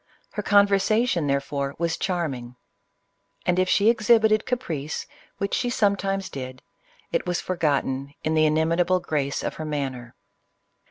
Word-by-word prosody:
Her - - -3
conversation, 200 -2 +3
therefore, 140 0 -1
was 170 0 0
charming; 140 -10 -3 0.9
and 180 0 +2
if 185 0 +2
she 205 - +3
exhibited 220 -1 +4
caprice, 165 - -3 0.3
which 200 - -2
she 245 - +1
sometimes 195 -3 0
did, 130 -1 -7 0.5
it - - -1
was 175 -1 0
forgotten 140 -5 -1
in 155 - 0
the 155 0 +4
in 155 0 +2
imitable 170 +3 +2
grace 145 -5 -2
of - - -3
her 155 - -4
manner. 135 -5 -4
170 Hz, 140 wpm, -25 LUFS, 140-200 Hz, 0.9 s, exhibited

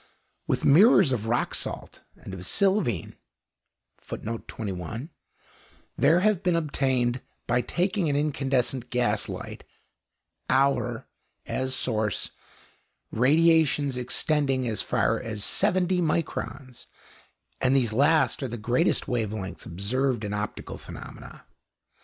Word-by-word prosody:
With - - 0
mirrors 170 - +6
of 115 -3 -1
rock 120 +2 0
salt - - -5
and 95 - -10
of 95 -1 -7
sylvine 190 - 0 2.8
there 170 +2 +4
have 210 -3 +2
been 180 -3 +1
obtained, 130 -6 0 0.2
by 125 +1 +1
taking 180 - 0
an 140 - 0
incandescent 135 -4 0
gas 115 -4 0
light - - -7 0.9
(Auer) 130 -3 +1 0.4
as 130 0 -2
source, 110 -4 -1 0.8
radiations 145 +1 +3
extending 130 +1 0
as 110 -3 -1
far - - +1
as 105 -2 -3
70 180 +5 +2
microns; 140 -5 -3 0.7
and 130 +1 +2
these 120 -5 +2
last 145 +1 +3
are 135 - -2
the 120 0 -5
greatest 120 +3 +1
wave 115 -4 -1
lengths 95 -3 -6
observed 120 +7 -1
in 105 0 -3
optical 105 0 -5
phenomena. - - -11
130 Hz, 110 wpm, -26 LUFS, 115-155 Hz, 2.8 s, mirrors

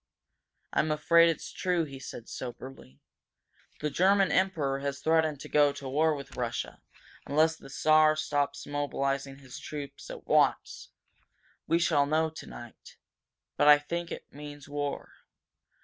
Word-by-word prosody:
"I'm 155 - +1
afraid 165 +3 +5
it's 165 - -4
true," 180 -3 0
he 135 -3 -8
said, 120 -3 -9
soberly. 125 - -9 0.8
"The 150 0 -1
German 195 +3 +3
Emperor 160 -8 +1
has 140 0 -3
threatened 160 -1 +1
to - - -8
go 145 -1 +4
to 140 -1 -8
war 155 +4 +2
with 140 -1 -9
Russia, 120 -1 -4 0.5
unless 160 +3 +3
the 150 - -14
Czar 155 +2 +4
stops 145 -2 -1
mobilizing 140 -1 -2
his 135 -2 -11
troops 145 -2 -8
at - - -9
once. - - +1 0.8
We 165 - +3
shall 155 -4 +2
know 160 +1 +1
tonight. 120 -6 -11 0.6
But - - +3
I 150 0 +9
think 170 +3 -5
it - - -6
means 145 0 -10
war! 145 0 -4
145 Hz, 140 wpm, -29 LUFS, 140-160 Hz, 0.8 s, I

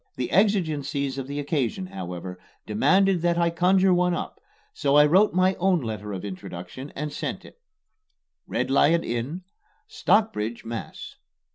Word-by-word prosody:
The 125 - -3
exigencies 150 -9 +1
of 130 - -5
the 140 +1 -4
occasion, 145 - -1
however, 90 - -7 0.3
demanded 185 - +3
that 170 0 +1
I 170 -1 +2
conjure 185 +2 +3
one 180 0 +2
up, - - -6 0.3
so 140 0 +1
I 150 0 +7
wrote 185 +6 +4
my 185 +1 +3
own 185 -1 +3
letter 110 -5 -5
of 95 0 -5
introduction 95 +7 -8
and 150 0 -4
sent - - -5
it: - - -16 0.9
RED - - -2
LION 165 +4 +4
INN, 125 +10 -4 0.4
STOCKBRIDGE, 120 - 0
MASS. 115 0 -7
150 Hz, 145 wpm, -25 LUFS, 115-180 Hz, 0.9 s, I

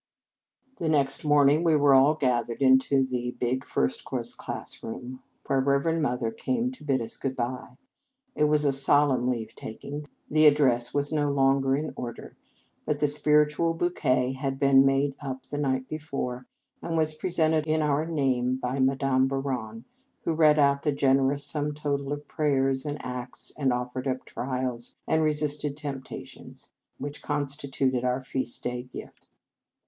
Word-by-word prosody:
The 165 - -2
next 140 -3 +2
morning 145 +1 +4
we 165 -2 +3
were 145 -2 +5
all 135 +3 +5
ga 125 -5 +1
thered 115 0 -7
into 135 0 +4
the 125 -1 -3
big 130 +1 -1
First 65 - -1
Cours - - -3
class - - -5
room, 125 +3 -7 0.2
where 135 -1 +1
Reverend 140 +5 +1
Mother 125 -5 -1
came 250 - -2
to 255 - -13
bid 135 -4 0
us 115 - -6
good 130 -1 -3
by. 125 0 -4 0.6
It 150 - +2
was 150 0 +3
a 140 - +4
solemn 135 -1 +4
leave 115 -3 -3
taking. 145 +7 -7 0.2
The 155 +1 +5
address 130 -5 +3
was 145 0 0
no 150 -2 +1
longer 135 -1 +2
in 155 +1 -4
order; 120 -2 -7 0.5
but 150 -1 -1
the 150 0 +2
spiritual 150 +2 +3
bouquet 130 -7 +1
had 135 0 -3
been 135 -1 +5
made 135 +1 +1
up 130 -2 -5
the 145 - -6
night 130 -2 -1
before, 140 -5 -5 0.3
and 165 -1 -3
was 155 -1 +2
presented 160 -1 0
in 155 0 +1
our 150 0 +1
name 130 -5 0
by 130 +1 -3
Madame 135 0 +2
Bouron, 125 -5 -4 0.4
who 165 - -1
read 155 -1 +4
out 140 -1 +3
the 150 - +1
generous 140 0 +2
sum 150 -1 -1
total 140 -2 -2
of 145 0 -4
prayers, 135 -2 0
and 145 0 -3
acts, 125 0 -4
and 135 -3 +1
offered 125 +2 -3
up 130 0 -2
trials, 125 -2 -4
and 160 - +2
resisted 150 -1 0
temptations, 140 -3 -7 0.3
which 145 +1 -6
consti 145 -1 -3
tuted 130 -2 0
our 125 +1 0
feast 130 -1 -2
day 125 0 -3
gift. 125 0 -11
140 Hz, 165 wpm, -27 LUFS, 130-150 Hz, 0.6 s, were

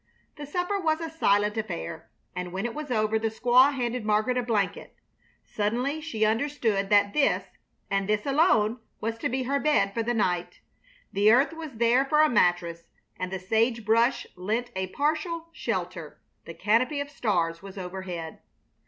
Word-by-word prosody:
The 295 -2 -8
supper 360 +6 -1
was 315 -3 +1
a 325 -1 -5
silent 210 -9 +2
affair, 170 -6 -5 0.3
and 180 -1 -4
when 190 +4 -3
it 240 - -3
was 300 -1 -6
over 220 -2 +1
the 225 - 0
squaw 245 +5 +4
handed 250 -3 -2
Margaret 215 +4 +1
a 250 - +1
blanket. 215 -5 -2 0.5
Suddenly 245 +9 -1
she 225 -9 -1
understood 220 -4 0
that 205 -1 +4
this, 295 -2 +2 0.5
and 195 0 0
this 210 0 +1
alone, 255 - +3 0.2
was 225 +1 -3
to - - -1
be 260 +1 -1
her 280 +3 0
bed 275 -10 +2
for 230 - -1
the 240 +2 -1
night. 180 -5 -1 0.5
The 205 +2 +5
earth 270 +7 +4
was 320 -3 -8
there 235 +3 +3
for 300 +2 +3
a 310 - +4
mattress, 175 -5 +1 0.3
and 185 0 -3
the 190 - -2
sage 225 +4 0
brush 230 +4 +2
lent 220 +7 -2
a 190 0 -2
partial 315 - -2
shelter, - - -4 0.3
the - - -9
canopy 250 +7 +1
of 285 0 -4
stars 170 - -1
was 195 0 -11
overhead. 180 -3 -6
225 Hz, 170 wpm, -27 LUFS, 200-275 Hz, 0.5 s, The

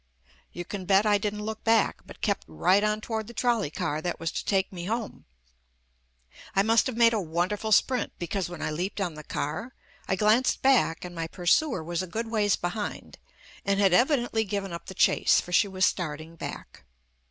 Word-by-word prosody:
You 175 - -6
can 190 0 -6
bet 195 +2 +4
I 205 -1 +3
didn't 210 +1 -3
look 220 0 -5
back, 225 -2 +2
but - - -13
kept - - -1
right 130 - +2
on 215 0 0
toward 220 -1 -4
the 235 - -11
trolley 235 - +1
car 150 0 -3
that 175 +1 -3
was 165 -1 -2
to - - -4
take 195 -1 0
me 175 -1 -6
home. 225 +2 -4 1.3
I 195 - +4
must 225 +4 +3
have 250 -3 -4
made 230 -1 +5
a 215 - 0
wonderful 180 +6 -2
sprint, 250 +4 +3
because 180 +1 -3
when 175 -2 -7
I - - -1
leaped 180 +7 -3
on 180 -4 -1
the 155 0 -10
car, 185 - -4 0.3
I 190 - +1
glanced 215 +6 +2
back 250 -12 +3
and 175 - -8
my 165 -1 -4
pursuer 180 - +1
was 170 +1 -2
a 185 - -5
good 225 +5 -4
ways 205 -3 +2
behind 180 +4 -5 0.4
and 200 0 +1
had 195 -3 +4
evidently 240 - +2
given 195 -2 -4
up 170 - -8
the 190 - -8
chase, - - +4
for 180 - -7
she 190 +4 +4
was 190 -1 +1
starting 160 -1 -3
back. - - -8
200 Hz, 200 wpm, -27 LUFS, 175-220 Hz, 1.3 s, made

